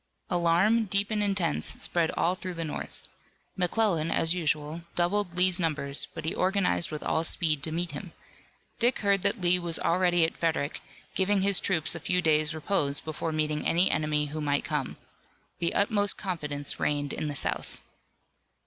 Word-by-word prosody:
Alarm, 175 +7 +3
deep 200 +1 +1
and 215 -1 0
intense, 195 -6 0
spread 170 -2 0
all 175 - +2
through 185 -1 -6
the 165 - -2
North. 155 - -7 0.5
McClellan, 180 -3 +1
as 165 0 +2
usual, 155 -1 -2
doubled 175 0 0
Lee's 180 0 +4
numbers 150 -4 -1
but 165 -1 -6
he 160 - 0
organized 185 - +1
with 150 - -6
all 160 - 0
speed 160 -3 +1
to 160 - -1
meet 170 +2 -2
him. - - -8 0.7
Dick 240 +1 +2
heard 200 -2 +2
that 200 +1 0
Lee 180 0 +3
was 170 -2 +2
already 175 -1 +2
at 160 - -4
Frederick, 160 -3 -1 0.3
giving 195 +1 +2
his 195 -1 +4
troops 165 -5 +1
a 170 - -3
few 180 +3 0
days' 155 -2 +3
repose 150 -4 0
before 160 +1 -4
meeting 155 -1 -1
any 175 +3 +3
enemy 150 -1 0
who 150 +2 -5
might 145 -1 0
come. - - -3 0.6
The 170 0 0
utmost 205 0 +2
confidence 150 -7 -2
reigned 145 -1 -1
in 155 - -3
the 145 - -4
South. - - -2
170 Hz, 170 wpm, -28 LUFS, 155-190 Hz, 0.7 s, Lee's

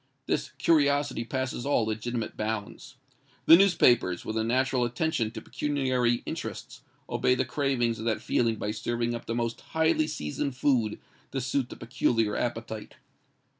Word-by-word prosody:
This 130 - -1
curiosity 145 -3 +2
passes 130 +1 -3
all 135 -5 +2
legitimate 110 +1 -3
bounds. 110 -2 -4 0.5
The 165 - +10
newspapers, 125 - +4
with 110 - -3
a 110 - +1
natural 130 +2 +1
attention 120 0 0
to - - -8
pecuniary 130 -5 0
interests, - - -6 0.3
obey 125 - +2
the 130 - 0
cravings 120 -3 0
of 110 - -5
that 110 -2 +1
feeling 115 -2 +1
by 105 -1 -3
serving 120 +2 -2
up 120 - -6
the 115 - -2
most 115 -1 -2
highly 160 -1 +1
seasoned 125 - -3
food 125 -6 +1 0.4
to 135 - -1
suit 130 0 -1
the - - -8
peculiar 115 -3 0
appetite. 115 -2 -4
120 Hz, 150 wpm, -28 LUFS, 115-135 Hz, 0.5 s, The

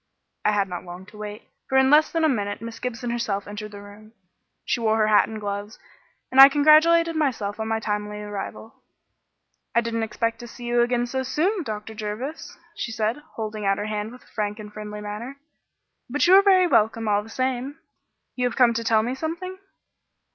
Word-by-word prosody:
I 210 - +3
had 200 -1 +1
not 180 -1 -6
long 180 +1 -10
to 210 - -14
wait, 210 0 -7 0.3
for 265 - +2
in 265 +1 +5
less 305 +1 +5
than 330 -1 0
a - - +5
minute 205 -7 -1
Miss 230 +1 -8
Gibson 245 -1 -4
herself 215 -4 -2
entered 210 +1 -6
the 205 -1 -11
room. 210 +2 -14 0.5
She - - 0
wore 220 -1 +2
her 215 - +3
hat 210 - +5
and 220 -1 -6
gloves, 205 +1 -5 0.5
and 265 +1 +8
I 275 - +12
congratulated 315 +3 +5
myself 225 -9 -1
on 220 - -2
my 225 0 0
timely 210 -1 -3
arrival. 210 +2 -7 0.9
"I 235 - +5
didn't 230 -1 -2
expect 230 +1 -2
to 240 - -8
see 240 - -12
you 240 0 +2
again 240 0 +1
so 260 +2 -2
soon, 320 - 0
Dr. 215 -5 -6
Jervis," 220 +8 -6 0.2
she 235 - -4
said, 220 +2 -1 0.2
holding 215 -1 -4
out 195 0 +2
her 205 - -3
hand 215 0 -3
with 250 - -14
a - - -25
frank 210 -1 -2
and 210 -1 -10
friendly 210 0 -7
manner, 215 +6 -6 0.7
"but 290 +4 +1
you 355 - +5
are 390 - +9
very 380 -2 +5
welcome 225 -7 +2
all 205 -1 +2
the 215 - -13
same. 260 +3 -2 0.6
You 250 -1 +1
have 240 - -6
come 245 -3 +5
to 230 0 -2
tell 220 -1 +3
me 245 +3 -2
something?" 345 +6 -5
225 Hz, 205 wpm, -24 LUFS, 210-260 Hz, 0.9 s, I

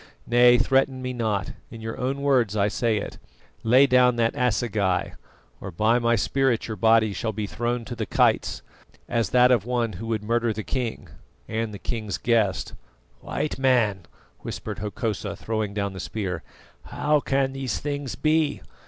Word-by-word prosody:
Nay, 120 0 +6
threaten 135 +1 +2
me 125 0 -3
not 110 -5 -1 0.2
in 115 - -10
your 110 0 -5
own 135 +2 -2
words 125 -7 +2
I 100 0 +2
say 115 0 0
it 100 - -6 0.4
'lay 125 +5 +5
down 125 -2 +4
that 115 -1 +1
assegai, 110 -7 0 0.5
or - - -7
by 110 +7 +2
my 120 0 +2
spirit 130 +2 +1
your 110 - -4
body 110 -1 +3
shall 110 +1 -3
be 105 0 -3
thrown 120 +3 -2
to 120 - -6
the 110 -3 -4
kites, - - +1 0.4
as 115 -3 0
that 125 0 +5
of 120 -6 +3
one 120 -2 -1
who 115 +6 -7
would 110 -2 -2
murder 115 +1 +1
the 110 +1 -5
king' 125 -2 -4 0.4
and 110 0 -2
the 105 - -7
king's 110 -2 -4
guest!" 110 -6 0 0.5
"White 150 - -3
Man," 115 -9 +2 0.3
whispered - - -6
Hokosa 105 +1 -3
throwing 110 -2 -3
down 100 -1 -2
the 95 - -8
spear, 90 -3 -4 0.4
"how 150 0 +1
can 135 -1 0
these 135 -3 -3
things 145 -3 -4
be? 155 -1 +1
115 Hz, 170 wpm, -25 LUFS, 105-125 Hz, 0.5 s, Nay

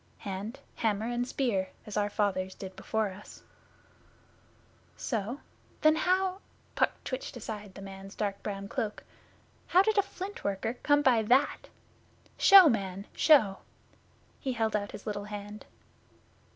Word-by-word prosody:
'Hand, 205 +5 -6 0.2
hammer, 215 -1 0
and 240 0 -1
spear, 215 -9 0 0.2
as 210 - -7
our 205 -1 +1
fathers 190 -3 -1
did 190 -1 -8
before 220 -2 -1
us.' 195 +2 -13 1.5
'So? 230 +3 -3 0.4
Then 310 0 +6
how' 370 +3 +1 0.3
Puck - - +2
twitched 255 -1 -5
aside 210 -4 -7
the 195 - -9
man's 195 0 -9
dark 200 -2 -2
brown 200 -1 -5
cloak 210 +1 -3 0.6
'how 370 +2 +5
did 435 0 +2
a - - +7
Flint 395 0 -8
worker 200 +3 -1
come 290 0 +3
by 245 -5 +5
that? 255 +6 +2 0.7
Show, 390 -3 +9
man, 195 -6 -1
show!' 215 -11 +5 0.8
He 265 -3 -2
held 225 -2 0
out 205 -1 -2
his - - -9
little 205 -2 -3
hand. 210 0 -8
215 Hz, 140 wpm, -30 LUFS, 200-265 Hz, 1.5 s, Show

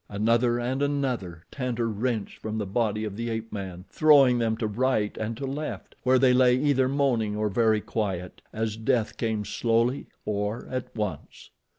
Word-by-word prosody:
Another 115 +4 +2
and 130 +3 -2
another 125 - -1
Tantor 125 -4 -2
wrenched 110 0 -2
from 110 0 -4
the 105 - -2
body 110 +1 0
of 105 -2 -4
the 115 +2 -3
ape 115 0 -4
man, 95 -3 -6
throwing 140 -5 +5
them 110 -1 0
to 115 - -2
right 110 -1 0
and 110 +1 -4
to 140 - -4
left, 145 +3 -5
where 130 +1 +4
they 130 0 +5
lay 125 -1 +5
either 135 -2 +2
moaning 125 -7 +1
or 105 0 0
very 110 +1 +2
quiet, 95 -6 -3
as 110 -1 -2
death 115 0 0
came 110 -3 -2
slowly 115 +5 0 0.2
or 105 +2 -2
at 130 -1 -4
once. 105 -3 -5
115 Hz, 175 wpm, -26 LUFS, 105-130 Hz, 0.2 s, throwing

